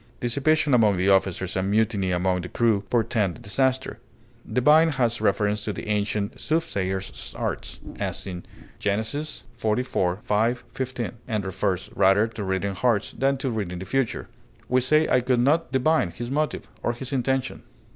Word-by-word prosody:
Dissipation 140 +4 +2
among 110 -5 +4
the 95 +2 +2
officers 95 -1 +2
and 95 +1 0
mutiny 105 -2 +1
among 90 +1 +1
the 90 - -7
crew 115 -4 +2
portend 110 -7 +1
disaster. 130 +5 0 0.5
Divine 150 +6 +5
has 120 -3 0
reference 105 0 +1
to 105 - -2
the - - -7
ancient 105 -1 -1
soothsayers' 95 - -2
arts - - -4 0.2
(as - - -3
in 90 -2 -6 0.4
Gen. 100 +1 +1
xliv, 115 -6 -2
5, 115 +4 +1
15), 130 -3 -3 0.2
and 105 -3 -2
refers 95 -1 -2
rather 95 +3 +4
to 110 -2 -6
reading 95 +1 -1
hearts 115 0 +1
than 135 +1 +1
to 130 -1 -2
reading 100 -6 -3
the 95 - -6
future. 135 0 -1 0.4
We 130 0 +3
say 155 +5 +3
I 125 - +3
could 125 0 +1
not 150 +7 +2
divine 130 - +2
his 120 +8 -6
motive, 150 +2 -1
or 120 - 0
his 130 +3 -6
intention. 130 0 -1
110 Hz, 155 wpm, -25 LUFS, 100-130 Hz, 0.5 s, Divine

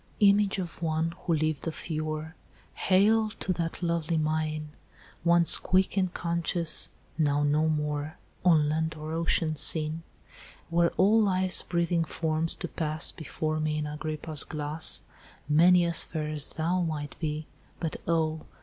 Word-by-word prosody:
"'Image 200 -1 +4
of 175 -3 -5
one 160 0 0
who 170 - -2
lived 155 0 -1
of 160 - -4
yore, 155 0 -3 0.4
Hail 215 +3 +3
to 185 - +1
that 165 +1 -4
lovely 170 -1 0
mien! 155 0 -1 0.5
Once 170 0 +5
quick 190 +1 +1
and 185 -2 +1
conscious, 170 -1 +1 0.3
now 145 -1 +2
no 150 +2 +2
more 150 0 -2 0.3
On 160 -5 +5
land 160 +2 -1
or 155 +1 -6
ocean 165 -1 +1
seen; 155 +1 +1 0.7
Were 170 0 +3
all 210 +4 +5
life's 185 -2 +1
breathing 170 -1 0
forms 160 0 0
to 175 - -4
pass 155 -1 -2
Before 155 -1 -3
me 155 0 -1
in 150 - -2
Agrippa's 155 0 -1
glass, 150 +1 -2 0.5
Many 175 +4 +5
as 170 -1 +1
fair 155 -2 -4
as 150 -1 0
thou 170 +3 0
might 155 -4 -3
be, 155 -1 -3 0.3
But 165 -2 -3
oh! 160 -1 0
160 Hz, 145 wpm, -28 LUFS, 155-170 Hz, 0.7 s, Once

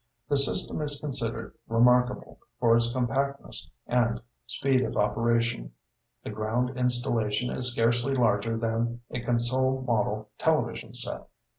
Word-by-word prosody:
The 145 - +2
system 140 +2 +4
is 145 -1 +2
considered 115 -6 -3
remarkable 125 +2 +2 0.2
for 115 -1 +4
its 115 0 +3
compactness 130 -7 -2 0.2
and 120 -1 +1 0.3
speed 135 -1 +1
of - - -3
operation. 115 - 0 0.5
The - - -6
ground 115 +4 -1
installation 120 -3 0
is 125 -1 +1
scarcely 120 +3 +1
larger 115 -2 +1
than 115 +1 -2
a 120 - -3
console 130 +2 0
model 110 -3 -1
television - - -1
set.' - - -4
120 Hz, 125 wpm, -27 LUFS, 115-125 Hz, 0.5 s, system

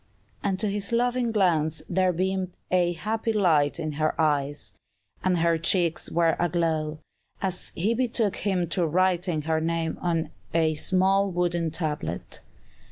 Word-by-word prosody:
And 190 -2 -1
to 215 - +2
his 200 +1 -2
loving 245 0 +1
glance 165 -7 +1
there 185 +1 +2
beamed 185 +1 -2
a 175 -1 +3
happy 220 +6 -2
light 170 -8 +2
in 155 -2 -2
her 155 +2 -1
eyes, 145 -8 0 0.5
and 185 -1 +2
her 165 0 +2
cheeks 170 0 +1
were 165 -1 +2
aglow, 160 -3 0 0.4
as 185 -2 -3
he 205 +7 +1
betook 230 -4 +1
him 185 -4 0
to 170 +1 +1
writing 175 -1 +1
her 160 0 0
name 165 0 -1
on 165 -3 -1 0.2
a 160 -1 +3
small 190 +5 +2
wooden 175 -2 0
tablet. 150 - -4
175 Hz, 145 wpm, -26 LUFS, 160-190 Hz, 0.5 s, a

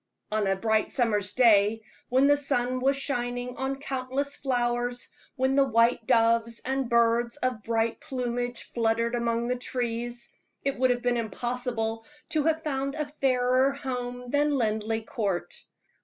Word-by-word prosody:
On 215 -2 +1
a 195 - +2
bright 220 +2 +1
summer's 210 -5 +1
day, 220 -3 +4 0.3
when 260 +2 +4
the 290 +1 +6
sun 255 -3 0
was 270 +2 +2
shining 245 -2 -2
on 265 +1 -1
countless 275 0 -3
flowers, 245 -2 -1 0.3
when 260 +1 +1
the 275 - +6
white 230 -2 +2
doves 230 0 +3
and 265 -1 -1
birds 235 +1 +2
of 255 -5 -1
bright 225 +1 0
plumage 245 -4 -3
fluttered 230 0 0
among 235 0 0
the 250 - 0
trees, 240 -1 -3 0.3
it 275 0 0
would 255 0 +4
have 245 -1 0
been 245 -1 +2
impossible 230 0 -2 0.3
to 310 -3 0
have 320 0 +1
found 275 -1 -2
a 305 -1 -2
fairer 260 -2 +2
home 250 -2 -5
than 290 0 +2
Linleigh 220 -1 0
Court. 200 -9 -2
245 Hz, 150 wpm, -27 LUFS, 230-265 Hz, 0.3 s, the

